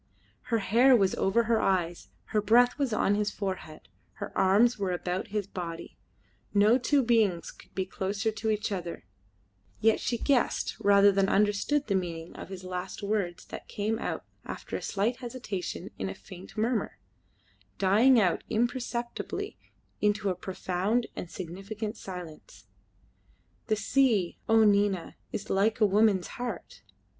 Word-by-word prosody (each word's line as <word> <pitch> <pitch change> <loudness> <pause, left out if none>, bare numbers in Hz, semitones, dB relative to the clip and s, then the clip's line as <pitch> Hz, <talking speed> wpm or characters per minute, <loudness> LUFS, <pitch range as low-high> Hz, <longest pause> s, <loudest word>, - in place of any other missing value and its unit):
Her 235 -2 +1
hair 235 +6 +5
was 195 -5 +3
over 205 +5 +2
his 230 0 +2
eyes, 175 -3 0 0.2
her 210 - +3
breath 245 +6 +4
was 275 -4 +1
on 210 -1 +2
his 210 0 +1
forehead, 185 -7 -5 0.3
her - - -7
arms 210 +5 +4
were 195 -2 0
about 180 +1 -3
his 210 -1 -2
body. 170 -3 -7 0.6
No 210 +5 +5
two 280 +2 +2
beings 220 -7 +2
could - - -19
be 190 - -1
closer 200 +4 -2
to 220 +1 -3
each 215 0 -1
other, 175 - -5 0.7
yet 220 0 +3
she 235 - -1
guessed 265 0 +1
rather 200 0 +6
than 195 0 +2
understood 210 +8 +2
the 200 - -1
meaning 170 -3 -3
of - - -8
his 190 -1 -8
last 185 +1 -5
words 200 -4 -2
that - - -8
came 215 +2 -2
out - - -4 0.2
after - - -6
a - - -3
slight 215 +5 -1
hesitation 215 -7 -5
in 95 - -2
a 95 - -6
faint 180 - -12
murmur, 230 +2 0 0.8
dying 225 +7 +5
out 180 -5 +2
imperceptibly 240 +1 -2 0.5
into 205 -1 +2
a - - -2
profound 190 +5 -1
and 175 - -6
significant 200 +6 -6
silence: 180 -7 -9 1.0
"The 215 - +2
sea, 215 -4 +2
O 225 0 +6
Nina, 200 -3 +2 0.2
is - - -5
like 210 +4 +2
a 215 - +6
woman's 200 -2 +3 0.2
heart." 245 - -5
205 Hz, 150 wpm, -29 LUFS, 185-225 Hz, 1.0 s, rather